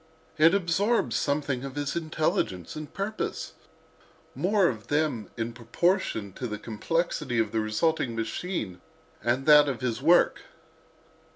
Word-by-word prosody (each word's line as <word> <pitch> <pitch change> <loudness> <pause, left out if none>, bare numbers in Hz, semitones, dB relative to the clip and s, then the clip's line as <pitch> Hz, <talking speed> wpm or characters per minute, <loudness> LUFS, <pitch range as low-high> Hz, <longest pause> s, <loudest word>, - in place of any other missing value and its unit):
It 165 +4 +6
absorbs 200 +5 +1
something 140 -3 -1
of 135 -1 -6
his 145 +1 -2
intelligence 155 - -1
and 155 -1 -7
purpose—more 200 -1 -3
of 110 -7 -4
them 145 -9 0
in 115 0 -3
proportion 115 - 0
to 125 - -5
the 105 -2 -4
complexity 125 +4 -2
of 110 -2 +1
the 110 - 0
resulting 115 +4 0
machine 115 - -3 0.4
and 120 +3 0
that 150 -1 +7
of 130 -3 -4
its 120 -1 -1
work. 170 +5 +4
140 Hz, 125 wpm, -27 LUFS, 115-165 Hz, 0.4 s, that